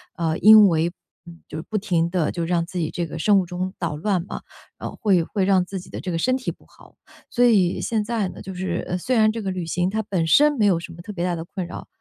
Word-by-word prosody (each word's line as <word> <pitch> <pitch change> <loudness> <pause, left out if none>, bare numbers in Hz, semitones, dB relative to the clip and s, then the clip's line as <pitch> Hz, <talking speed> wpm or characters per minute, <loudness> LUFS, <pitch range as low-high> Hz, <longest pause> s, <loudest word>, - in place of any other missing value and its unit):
呃， 160 -1 -1
因 215 -2 +8
为， 165 +1 +1 0.6
就 155 - -6
是 160 - -5
不 215 - -1
停 170 -4 0
地 175 -4 0
就 170 -1 -3
让 170 -1 0
自 180 0 -5
己 160 - -1
这 175 - -3
个 160 0 -7
生 205 +3 +4
物 - - -5
钟 180 +2 -4
倒 165 -4 -3
乱 185 0 -1
嘛， - - -6 0.4
呃， - - -5
会 190 -5 +1
会 195 +3 -2
让 185 -2 +3
自 190 -1 -6
己 - - -15
的 - - -6
这 180 - -4
个 - - 0
身 255 +9 +1
体 255 - -4
不 - - -19
好。 - - -20 0.3
所 245 - +1
以 195 -7 +3
现 220 -2 -1
在 215 -5 -1
呢， - - -10
就 190 - -7
是 180 -1 -3
虽 245 +7 -1
然 215 0 +5
这 225 - -4
个 195 -2 -2
旅 180 -2 -4
行 175 +3 0
它 220 +2 -1
本 180 -5 -1
身 295 - +5
没 220 -6 +1
有 180 -4 +3
什 170 0 -9
么 170 - -11
特 210 - -8
别 180 -3 -3
大 175 -1 0
的 165 - -5
困 175 0 -6
扰， - - -9
185 Hz, 295 characters per minute, -23 LUFS, 170-210 Hz, 0.6 s, 因